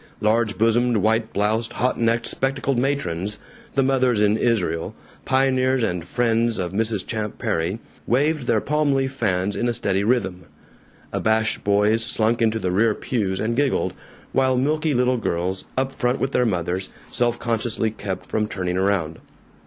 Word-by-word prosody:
Large 110 0 +1
bosomed, 115 +1 +3
white 110 +2 +1
bloused, 110 +3 0
hot 125 +2 0
necked, 115 0 +1
spectacled 135 -1 -1
matrons 105 -8 -1 0.4
the 135 - +3
Mothers 130 -4 +2
in 105 0 +3
Israel, 110 -8 0 0.3
pioneers 130 -1 +2
and 90 -5 -1
friends 115 +1 +1
of 90 -2 -2
Mrs. 110 0 0
Champ 105 -2 -4
Perry 85 +5 -1 0.3
waved 145 +2 +1
their 110 - +2
palm 150 -1 +1
leaf 135 0 0
fans 100 -5 0
in 120 - 0
a 120 - -1
steady 95 -2 0
rhythm. 95 -7 0 0.7
Abashed 110 0 +1
boys 105 +2 +3
slunk 115 +1 +1
into 110 -1 +2
the 95 -5 -1
rear 105 +3 +3
pews 100 -6 -2
and 115 +2 -1
giggled, 140 0 +1 0.4
while 130 -1 +2
milky 150 +2 +1
little 125 +1 +2
girls, 95 -3 -2
up 135 0 0
front 125 -1 -1
with 135 - -1
their 125 -2 +2
mothers, 90 -1 -2 0.2
self 120 -1 +1
consciously 115 -1 -1
kept 95 -3 -5
from 105 -1 -1
turning 90 -3 -2
around. 95 -5 0
115 Hz, 160 wpm, -22 LUFS, 100-125 Hz, 0.7 s, bosomed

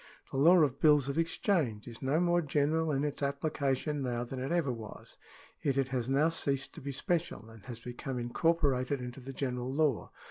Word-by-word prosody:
The - - -3
law 170 +7 +7
of 140 -2 0
bills 150 -3 +5
of 140 - -1
exchange 160 - 0
is 115 -1 -9
no 140 +4 +1
more 175 0 +3
general 155 +1 +1
in 140 0 0
its 150 -1 -3
application 140 0 -1
now, 120 -2 -1
than 130 +2 -6
it 135 +5 -3
ever 170 -6 +1
was; 115 -3 -8 0.5
yet 140 -2 0
it 135 -1 +1
has 125 -1 -2
now 145 +4 +3
ceased 140 -4 -2
to - - -10
be 140 +1 -4
special, 140 - -2
and 115 -2 -14
has 120 -2 -7
become 125 +2 -5
incorporated 135 +1 +1
into 125 +1 -7
the 135 +1 -8
general 125 -2 -3
law. 145 -4 +1
140 Hz, 200 wpm, -31 LUFS, 125-155 Hz, 0.5 s, law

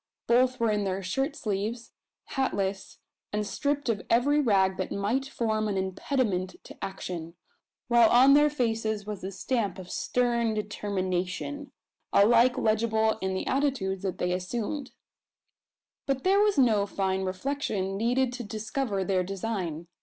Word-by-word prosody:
Both 255 +2 +3
were 230 -2 +2
in 210 -1 0
their 195 0 -2
shirt 270 - -1
sleeves, 220 0 -3 0.4
hatless, 200 -7 -2 0.3
and 210 0 -1
stripped 285 +6 -1
of 220 -4 0
every 285 +6 +3
rag 190 -6 +3
that 185 - -3
might 225 +7 -1
form 220 -4 -1
an 200 -2 -1
impediment 190 0 -1
to - - -11
action; 170 -3 -5 0.5
while 235 -2 +6
on 260 +3 +7
their 295 +1 +6
faces 225 -6 -1
was 210 -2 -5
the 190 - -5
stamp 200 0 -2
of 185 -1 -9
stern 235 -2 0
determination 205 +6 -3 0.4
alike 235 +4 +5
legible 220 -1 +1
in 190 0 -1
the 190 - -2
attitudes 255 -9 0
they 180 -2 -1
had 180 - +1
assumed. 240 +9 -4 1.2
But 270 -1 -1
there 390 +2 +4
was 415 -4 +3
no 220 -6 +4
fine 190 -1 -1
reflection 195 -1 -2
needed 245 +4 +1
to 245 -1 -5
discover 215 -1 -2
their 185 0 +1
design. 185 -4 -4
215 Hz, 145 wpm, -28 LUFS, 190-250 Hz, 1.2 s, on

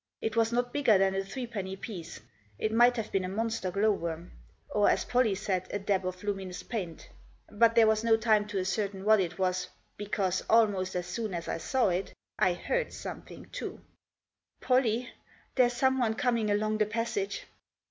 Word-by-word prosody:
It 220 0 -3
was 225 0 +3
not 245 +1 0
bigger 255 -8 +4
than 190 0 +2
a 195 0 -1
threepenny 200 -3 -5
piece. 185 -5 -8 0.4
It 215 - -1
might 240 +2 +5
have 225 -3 -4
been 195 - +1
a 185 - -3
monster 225 -1 -2
glow 200 +4 +2
worm. 170 -2 -4 0.4
Or, 205 -1 +3
as - - +1
Polly 245 -5 +2
said, 190 -2 -2
a - - -2
dab 195 -2 0
of 185 +1 -6
luminous 195 -3 -4
paint. 180 -8 -5 0.4
But 230 +2 +4
there 230 -1 +7
was 220 0 +2
no 225 -1 +4
time 215 -2 +2
to 205 -2 -4
ascertain 195 +1 -2
what 215 0 +6
it 175 -2 -2
was, 185 -1 0 0.3
because, 195 -3 -1
almost 205 -5 +3
as 180 -1 -1
soon 200 +2 -3
as 170 -1 -5
I - - -2
saw 255 +4 +1
it, 180 +2 -2 0.2
I 185 - +4
heard - - -2
something - - -8
too. - - -6 0.4
" - - -57
Pollie, 250 -1 +2 0.4
there's 245 -2 +3
someone 255 -3 +2
coming 230 -2 +1
along 215 +1 +1
the 215 - +3
passage." 235 - -2
210 Hz, 185 wpm, -29 LUFS, 190-230 Hz, 0.4 s, there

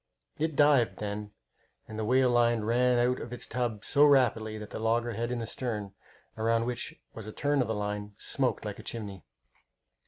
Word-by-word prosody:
It 160 -1 0
dived, 145 -5 +4
then, 105 0 -4 0.6
and 110 0 -7
the - - -1
whale 125 +3 +3
line 120 -1 +3
ran 120 +3 +2
out 125 +1 +2
of 120 - -7
its 125 - -4
tub 115 -4 -3
so 145 - +4
rapidly 120 -6 +3
that 105 -1 -9
the - - -5
loggerhead 115 +1 0
in 125 - -1
the 115 - -3
stern, 105 -6 -4 0.4
around 115 +1 +1
which 120 -1 -3
was 110 -2 -8
a - - -5
turn 145 +4 +1
of 125 - 0
the 110 - -1
line, 105 0 -4
smoked - - -1
like - - -5
a - - -9
chimney. 100 -6 -6
115 Hz, 190 wpm, -29 LUFS, 110-125 Hz, 0.6 s, dived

